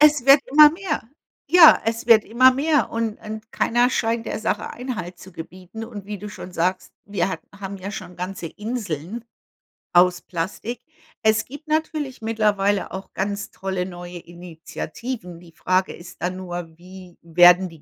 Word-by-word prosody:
Es 295 -4 +5
wird 275 +1 +8
immer 300 +2 +8
mehr, 340 -2 -3 0.5
ja, 350 -3 +8
es 225 +1 -2
wird 225 -3 +6
immer 255 +4 +5
mehr 290 -3 +2
und 225 -1 -2
und 220 +1 -8
keiner 240 +2 +2
scheint 230 -1 -1
der - - -3
Sache 220 - -2
Einhalt 205 -9 -6
zu 190 +1 -13
gebieten 185 +6 -9
und 215 -4 -9
wie 205 0 -5
du 210 +2 -7
schon 185 -2 -9
sagst: 180 +2 -1
„Wir 200 -1 -1
ha 165 - -3 0.2
haben 195 0 -6
ja 190 +2 -6
schon 180 -3 -8
ganze 180 0 -5
Inseln 210 - -5 0.7
aus 180 0 +5
Plastik.” 195 +7 -5 0.4
Es 220 0 +3
gibt 295 +4 -12
natürlich 305 -4 -2
mittlerweile 210 -3 +1
auch 190 +1 -8
ganz 200 +1 -3
tolle 190 -2 -3
neue 175 -1 -8
Initiativen. 175 +4 -8
Die 170 -1 -17
Frage 185 +3 0
ist 175 +1 -13
dann 180 +1 -2
nur, 175 -3 -7
wie 180 0 -13
werden 175 +2 +6
die 165 -3 -16
200 Hz, 165 wpm, -22 LUFS, 180-235 Hz, 0.7 s, wird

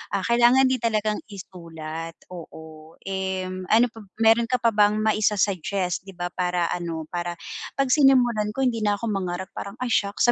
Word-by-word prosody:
ah, 190 - -1
kailangan 240 +4 +5
din 260 - 0
talagang 215 -2 0
isulat 165 -4 -8 0.2
oo, 160 -2 -11
and 185 -1 -3
ano 230 +4 +4
pa 225 - -13 0.2
meron 225 +1 +5
ka 250 - +1
pa 230 - +4
bang 210 -1 +3
maisa 215 -1 +1
suggest 190 -1 -1
'di 195 - -11
ba 175 0 -4
para 180 -2 -1
ano, 170 -2 -3
para 175 0 -3 0.4
pag 275 -2 0
sinimulan 250 -6 +4
ko 270 - 0
hindi 245 -3 +1
na 205 -1 +1
ako 225 +2 -3
mangarap 190 -2 -3
parang 200 +1 -7
ay 245 - -2
shocks 205 +3 +2
200 Hz, 175 wpm, -24 LUFS, 180-225 Hz, 0.4 s, kailangan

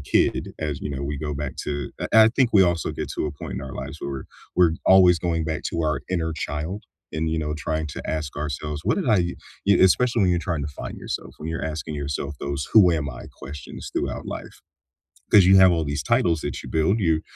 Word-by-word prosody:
kid - - +1
as, 75 -3 -3
you - - -4
know, 65 - -4
we 70 0 -3
go 75 0 -3
back 70 -1 -4
to 70 -3 -3
I 110 0 +5
I 110 - +6
think 125 0 +2
we 100 -2 +7
also 85 -2 +1
get - - -4
to - - -1
a 75 - -4
point - - -7
in - - -4
our 65 - -7
lives - - -6
where - - -4
we're 70 -1 -5 0.4
we're - - -2
always 90 -3 +7
going 85 -1 -1
back 80 -1 -3
to 85 - -1
our 75 0 0
inner 80 -3 0
child 80 +6 -4 0.3
and, 80 0 -1
you 80 - 0
know, 75 -1 -2
trying 80 0 -2
to 70 - -7
ask 75 -3 -3
ourselves, 75 +1 -4
"What - - +2
did 185 -11 -1
I" 110 - +5
y 90 -1 0 0.3
y 100 - +6
especially 115 +5 +4
when 90 - +4
you're 90 - +2
trying 80 -4 -1
to - - -3
find - - -6
yourself, - - -5
when 75 - -6
you're 80 0 -3
asking 80 -1 -4
yourself 70 0 -3
those 70 0 -3
"Who 95 -6 +8
am 75 -3 -1
I?" 60 - -9 0.2
questions 70 -1 -8
throughout - - -3
life, - - -7 0.8
'cause 100 -3 +8
you 95 +1 +7
have 95 -1 +8
all 80 -2 +1
these 75 +1 -2
titles 85 0 +2
that 70 -3 -4
you - - -10
build, 80 +8 +2
you 80 -5 +2
80 Hz, 240 wpm, -24 LUFS, 75-90 Hz, 0.8 s, Who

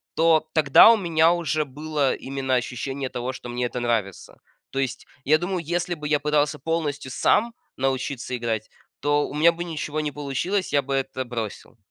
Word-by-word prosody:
то 160 -1 +3
тогда 155 +7 +7
у 230 - +4
меня 165 -4 +3
уже 160 -3 -1
было 145 0 -1
именно 135 -1 -2
ощущение 130 +2 -3
того, 125 +1 -3
что 125 - -9
мне 120 +1 -2
это 125 +1 -3
нравится. 115 -6 -2 0.3
То 135 - -2
есть, 130 -3 -3 0.2
я 155 +4 +4
думаю, 180 +3 -2
если 175 +2 -2
бы 150 -3 -5
я 150 -1 +2
пытался 150 0 +1
полностью 145 -5 -2
сам 230 - +2 0.2
научиться 130 -1 -2
играть, 115 -2 -3 0.3
то 145 0 +2
у - - -9
меня 160 +3 +5
бы 170 +1 -5
ничего 155 -2 -4
не 150 -1 -2
получилось, 145 +7 -2
я 145 - +4
бы 140 0 -4
это 130 -1 -2
бросил. 115 -1 -6
145 Hz, 180 wpm, -24 LUFS, 130-160 Hz, 0.3 s, тогда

